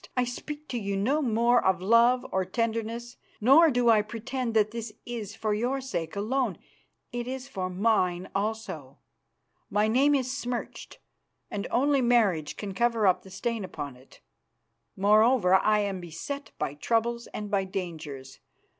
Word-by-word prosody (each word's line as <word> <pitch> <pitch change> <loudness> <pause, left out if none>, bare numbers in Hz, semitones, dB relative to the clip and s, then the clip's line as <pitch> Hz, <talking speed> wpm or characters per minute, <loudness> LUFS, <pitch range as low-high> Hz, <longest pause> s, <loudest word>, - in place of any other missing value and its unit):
I 250 - +4
speak 295 +5 -6
to 245 - -2
you 200 -2 -2
no 265 +10 +1
more 240 -1 +3
of 190 -1 +2
love 230 +6 +4
or 190 - +1
tenderness, 230 +4 -3 0.2
nor 280 +9 +7
do 245 -3 +1
I 215 -2 +5
pretend 230 +2 -4
that 215 -1 +3
this 230 -1 -6
is 220 -4 -6
for 215 -1 -1
your 245 +6 0
sake 170 -12 -4
alone. 220 -1 -1 0.5
It 240 -1 -4
is 260 +1 -5
for 190 -8 -4
mine 185 -2 +1
also. 195 -10 -4 0.7
My 210 +1 +2
name 275 +6 +4
is 260 -1 -1
smirched, 245 -3 -5 0.5
and 200 - -3
only 275 +2 +2
marriage 215 -11 +2
can 200 -2 -5
cover 230 +1 +1
up 185 -2 +3
the 190 - -14
stain 230 +3 -3
upon 145 -7 -6
it. 130 +2 -19 0.7
Moreover, 210 0 +4
I 210 +2 +4
am 195 -2 -3
beset 175 - -6
by - - -2
troubles 235 +8 -1
and 210 0 -6
by 195 -2 +1
dangers. 160 -8 -6
220 Hz, 155 wpm, -27 LUFS, 190-245 Hz, 0.7 s, nor